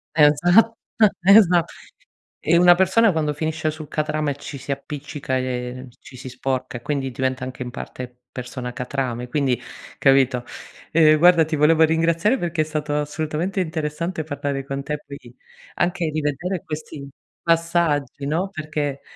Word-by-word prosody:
Esatt 175 +9 +5 0.5
esa 185 -3 +6 0.8
e 170 +2 +3
una 175 0 +7
persona 190 +5 +4
quando 150 -2 0
finisce 160 +1 -2
sul 155 -1 -9
catrame 150 -1 -1
ci 145 0 -8
si 135 +1 -6
appiccica 140 -1 -4
e 125 0 -4
ci 130 - -14
si 130 - -9
sporca, 130 0 -3
e - - -11
quindi 135 -1 -2
diventa 130 0 -2
anche 130 0 -5
in 125 - -6
parte 125 0 -8 0.2
persona 125 0 -6
catrame 125 -1 -3
quindi, 130 -3 0 0.4
capito? 135 -2 +3 0.5
Ehm, 155 -1 +5
guarda 170 0 +6
ti 155 +1 -2
volevo 155 +2 +4
ringraziare 165 +8 +2
perché 170 -4 -1
è - - +3
stato 150 -1 -3
assolutamente 155 +5 -2
interessante 160 +1 -3
parlare 140 -2 -4
con 140 0 -4
te, 150 +1 -3
poi 140 -4 -11 0.4
anche 175 -2 0
di 155 - -2
vedere 160 +5 -2
questi 150 -2 -7 0.3
passaggi, 165 -4 0
no, 170 +6 -1
perché 150 -5 -4
150 Hz, 145 wpm, -22 LUFS, 135-165 Hz, 0.8 s, una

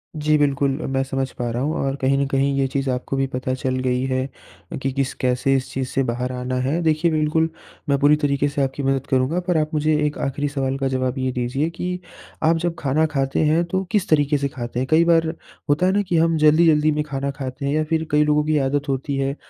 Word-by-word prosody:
जी, 155 0 +2
बिल्कुल। 140 -1 +2 0.2
मैं 135 0 0
समझ 135 0 -2
पा 120 -1 -1
रहा 120 +2 -2
हूँ। 155 +3 0
और 135 0 -1
कहीं 135 +1 +2
न 140 - +1
कहीं 135 0 +1
ये 135 -1 +2
चीज़े 135 0 -1
आपको 125 +2 -3
भी 135 - +2
पता 130 0 -3
चल 130 0 -2
गई 125 0 +1
है 130 0 -1 0.5
कि 135 - -1
किस 135 -1 -1
कैसे 130 +2 +1
इस 130 - -2
चीज़ 130 -1 -2
से 135 - 0
बाहर 125 +1 -2
आना 125 0 -3
है। 150 +7 0
देखिए 160 +1 +2
बिल्कुल 155 +1 +1 0.4
मैं 140 - +3
पूरी 145 +1 +5
तरीके 145 -1 +1
से 140 0 -2
आपकी 135 +1 -3
मदद 135 0 0
करूँगा। 130 +6 +1
पर 175 - +2
आप 155 +1 -1
मुझे 155 +1 +2
एक 150 - -2
आखिरी 145 +2 -2
सवाल 135 -1 -2
का 135 -1 -1
जवाब 130 0 -1
ये 130 0 0
दीजिए 125 +5 -1
कि 180 +2 -4 0.4
आप 165 +1 +4
जब 170 0 -2
खाना 150 +3 +1
खाते 135 +2 +1
हैं 160 +3 +3
तो 190 0 0
किस 210 -2 0
तरीके 145 -1 +3
से 140 0 -1
खाते 120 -2 -5
हैं? 130 - -1
कई 165 +2 +5
बार 165 -1 +3 0.4
होता 150 +5 +3
है 185 - +3
ना, 205 - +2
कि 180 -4 -1
हम 165 0 +3
जल्दी-जल्दी 155 0 +4
में 150 0 0
खाना 140 -1 -3
खाते 135 0 -6
हैं 140 - 0
या 155 - +1
फिर 160 -1 0
कई 150 0 +4
लोगों 150 0 +2
की 155 0 +2
आदत 145 +1 0
होती 135 +1 -2
है 135 +1 -1
140 Hz, 245 wpm, -22 LUFS, 135-155 Hz, 0.5 s, पूरी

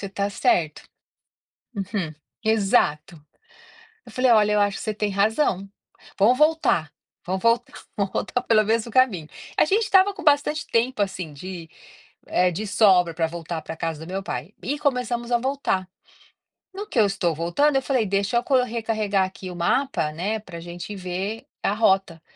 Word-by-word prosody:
você 200 - -4
está 200 +1 -2
certo". 160 -5 +1 0.9
Uhum. 195 -5 -3 0.3
Exato. 175 -8 +1 0.8
Eu - - -14
falei: 255 0 +2
"Olha, 210 -2 +5
eu 210 - +3
acho 205 -1 +1
que - - -7
você 215 - -2
tem 210 0 -1
razão. 200 0 +1 0.5
Vamos 220 +6 +5
voltar. 305 - +2 0.3
Vamos 185 +1 -2
voltar 230 +1 +2 0.2
vamos 200 -2 -1
voltar 245 - -2
pelo 220 -3 +3
mesmo 225 +2 0
caminho". 215 -12 +2 0.3
A - - +5
gente 405 +8 +2
estava 395 -1 +4
com 380 - -9
bastante 295 +1 +2
tempo, 230 -1 +1
assim, 185 -5 -4
de, 170 +2 -8 0.6
eh, 180 0 +2
de 210 +6 -4
sobra 185 -5 +4
para 165 0 0
voltar 165 0 -5
para 160 - -8
casa 160 -1 -4
do - - -12
meu 195 +1 -2
pai, 190 +1 -5
e 290 +3 -2
começamos 250 -4 -1
a 240 - +4
voltar. 255 -7 -1 0.9
No 405 +2 -6
que 420 - -4
eu 215 - +6
estou 190 -4 0
voltando, 175 - +1
eu 270 - +2
falei: 255 -4 0
"Deixa 200 +3 0
eu 235 - +3
co 270 - +2
recarregar 220 -4 0
aqui 185 0 -7
o 180 - -8
mapa, 175 - 0
né, 195 +8 -2
para 180 -5 -10
gente 175 +4 -7
ver 190 +4 -4 0.2
a - - +1
rota". 190 -6 +1
205 Hz, 175 wpm, -23 LUFS, 180-240 Hz, 0.9 s, eu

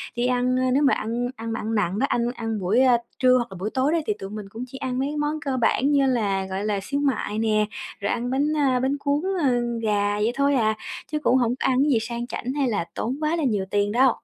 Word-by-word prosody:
đi 240 +1 +1
ăn, 250 0 +1
ơ, 255 - +1
nếu 280 +3 +3
mà 275 - +4
ăn 235 +2 -2
ăn 225 -1 -3
nặng 205 -1 0
đó, 275 - +3
ăn 240 0 +1
ăn 225 -2 -3
buổi, 200 +8 +2
ơ, 250 -2 +5 0.2
trưa 255 -1 +5
hoặc 240 - -1
là - - -8
buổi 205 - -2
tối 265 +3 +2
đó 335 - +2
thì 425 - +2
tụi 195 - -6
mình 210 0 -6
cũng 225 +4 -7
chỉ 265 - -9
ăn 260 -1 -3
mấy 285 +3 -1
món 295 +1 -1
cơ 270 -2 -1
bản 255 +4 +2
như 280 -1 +4
là, 205 -7 0
gọi 190 +2 -4
là, 205 -2 0
xíu 280 +6 -2
mại 265 -7 -1
nè, 215 -1 +2 0.3
rồi 200 - -1
ăn 240 +1 -2
bánh, 270 +3 +1
a, 265 -4 +2
bánh 265 +3 0
cuốn, 285 +1 0 0.2
ơ, 280 - +3 0.3
gà 205 -1 +1
vậy 215 +3 +1
thôi 280 +1 +2
à, 220 -3 +2 0.4
chứ 305 - 0
cũng 260 -3 +3
hổng 245 -1 +1
có - - +1
ăn 260 -1 +2
cái 295 - +2
gì 245 - +4
sang 235 +1 -4
chảnh, 250 +1 -4
hay 280 -2 0
là 205 -8 -1
tốn 250 +4 -2
quá 310 +2 +1
là 330 - -1
nhiều 210 -7 0
tiền 205 0 +1
đâu. 250 +2 +4
245 Hz, 270 wpm, -24 LUFS, 215-270 Hz, 0.4 s, ơ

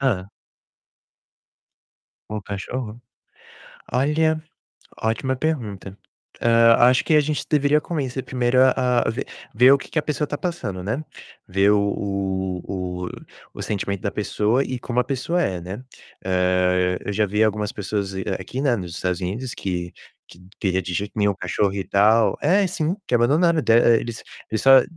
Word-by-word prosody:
Hã. 100 -9 0 2.0
Um 105 -1 -4
cachorro? 105 +4 -6 0.9
Olha, 155 +4 +1 0.6
ótima 115 +4 0
pergunta. 110 -10 -3 0.4
Hã, 115 0 +5 0.2
acho 125 - +2
que 160 - +2
a 150 - +7
gente 150 0 -2
deveria 150 0 +3
começar 135 -6 -3
primeiro 125 -1 0
a 125 -2 +3
a - - +2
ver 115 - -4 0.3
ver 125 +4 +7
o 140 - +5
que - - -11
que - - -2
a - - +1
pessoa 150 0 -2
está 145 - -4
passando, 170 - -4
né, 115 +9 -2 0.5
ver 95 +2 +3
o 105 - +3 0.8
o 90 -1 -4 0.5
o - - -6
sentimento 100 -2 -3
da 100 - -1
pessoa 105 +4 0
e 130 -2 -4
como 120 0 -1
a - - 0
pessoa 155 +6 -1
é, 90 - -1
né. 95 +7 -7 0.4
Eh, 90 0 +2
eu 105 - -1
já 105 +2 +2
vi 105 +2 +1
algumas 105 -1 0
pessoas 100 -1 -3
dize 95 -1 -5
aqui, 130 - -5
né, 135 -4 +2
nos 90 -5 -6
Estados 90 -1 -2
Unidos, 110 +8 -4
que 90 -2 -4 0.4
que - - -16 0.2
queria 95 -1 0
de 90 +1 -5
jeito 100 +4 -3
nenhum 105 -1 +3
o - - -14
cachorro 95 +2 0
e 100 -1 -3
tal 110 +3 +3
É, 190 +6 +3
sim, 175 -1 -2
que - - -1
abandonaram, 155 +7 +3
de 115 - +2 0.3
eles 115 0 -6 0.3
eles 110 - -1
só 135 -1 +8
115 Hz, 165 wpm, -22 LUFS, 95-135 Hz, 2.0 s, só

